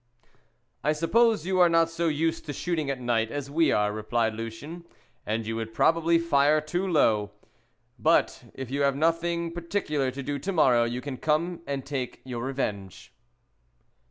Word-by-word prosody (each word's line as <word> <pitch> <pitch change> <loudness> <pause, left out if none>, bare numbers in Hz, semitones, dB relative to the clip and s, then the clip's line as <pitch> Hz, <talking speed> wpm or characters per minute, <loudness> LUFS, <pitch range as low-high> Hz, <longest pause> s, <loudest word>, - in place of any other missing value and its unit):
"I 150 - +2
suppose 215 +4 +2
you 185 0 0
are 175 -1 +6
not 165 0 +4
so 165 0 -1
used 160 +1 -1
to 145 - -3
shooting 160 -2 -2
at 135 -2 -2
night 115 -2 0
as 140 +1 -5
we 160 0 +3
are," 105 0 +1
replied 110 +1 -1
Lucien, 115 +10 -7 0.4
"and 110 +1 -1
you 115 +1 -3
would 115 0 -5
probably 165 +3 +3
fire 155 -2 +3
too 175 +5 -2
low. 110 - +2 0.7
But 105 - +2
if 130 -2 -7
you 140 +1 -1
have 140 -1 +2
nothing 165 +2 0
particular 170 -5 -2
to 135 +2 -6
do 145 +1 -3
to 195 - -3
morrow 130 -9 +4
you 120 +2 -3
can 140 -2 -6
come 165 +4 0
and 140 -2 -3
take 135 -3 -4
your 120 -2 -5
revenge." 100 -8 -4
145 Hz, 170 wpm, -27 LUFS, 120-165 Hz, 0.7 s, are